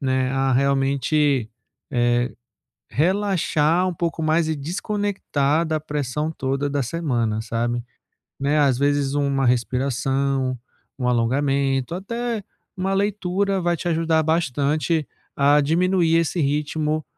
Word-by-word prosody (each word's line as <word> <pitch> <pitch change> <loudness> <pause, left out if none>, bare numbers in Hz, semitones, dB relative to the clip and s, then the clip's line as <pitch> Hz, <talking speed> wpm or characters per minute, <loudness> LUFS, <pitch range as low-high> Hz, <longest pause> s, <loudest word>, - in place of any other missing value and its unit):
né, 130 -2 0
a 135 0 +1
realmente, 140 -1 +2 0.4
eh, 120 +1 +1 0.6
relaxar 180 -1 +1
um 180 - -2
pouco 165 -1 -2
mais 160 +1 +2
e 160 - 0
desconectar 170 -2 -1
da 155 -1 -1
pressão 150 0 -2
toda 135 0 -2
da 140 0 0
semana, 120 -7 -1
sabe. 120 +1 -2 0.6
Né, 145 +2 +2
às 140 -4 +3
vezes, 140 0 +1
uma 140 -2 +1
respiração, 130 +1 0 0.4
um 125 - -1
alongamento, 135 +3 +1
até 230 +3 -3 0.3
uma 190 +1 -1
leitura 195 -1 0
vai 175 0 +1
te 175 - -8
ajudar 165 -1 +2
bastante 155 0 0 0.3
a 145 +1 +5
diminuir 170 +2 +2
esse 165 +1 +1
ritmo, 150 +1 -1
145 Hz, 120 wpm, -22 LUFS, 135-165 Hz, 0.6 s, a